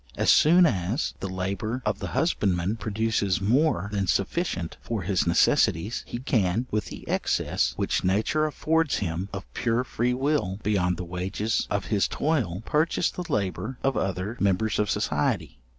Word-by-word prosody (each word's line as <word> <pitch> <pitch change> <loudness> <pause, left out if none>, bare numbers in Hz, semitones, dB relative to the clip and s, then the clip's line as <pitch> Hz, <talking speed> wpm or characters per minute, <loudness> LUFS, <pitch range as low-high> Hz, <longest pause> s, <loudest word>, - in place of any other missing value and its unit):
As - - +4
soon 175 +4 +6
as 105 - 0
the 95 - -4
labour 100 +6 -3
of 105 -2 0
the - - -4
husbandman 100 - +1
produces 110 -4 0
more 110 - +2
than 100 -2 -1
sufficient 95 - -1
for 110 -5 -3
his 95 -1 0
necessities, 85 +4 +2
he - - -4
can, 115 - 0
with 105 -1 0
the - - -9
excess - - 0
which - - -1
nature 110 +12 +1
affords 160 0 +1
him 90 0 -3
of 95 -1 -6
pure 120 +1 0
freewill 125 -4 0
beyond 90 -4 +1
the 90 - -4
wages 95 +5 -2
of 100 -1 -1
his 100 - +3
toil, 115 - -1
purchase 160 +3 +1
the 180 -1 -6
labour 105 +5 -2
of 135 0 +1
other 95 +4 -2
members 100 +2 +1
of 105 -1 +1
society. 75 -3 -1
105 Hz, 155 wpm, -26 LUFS, 95-125 Hz, -, soon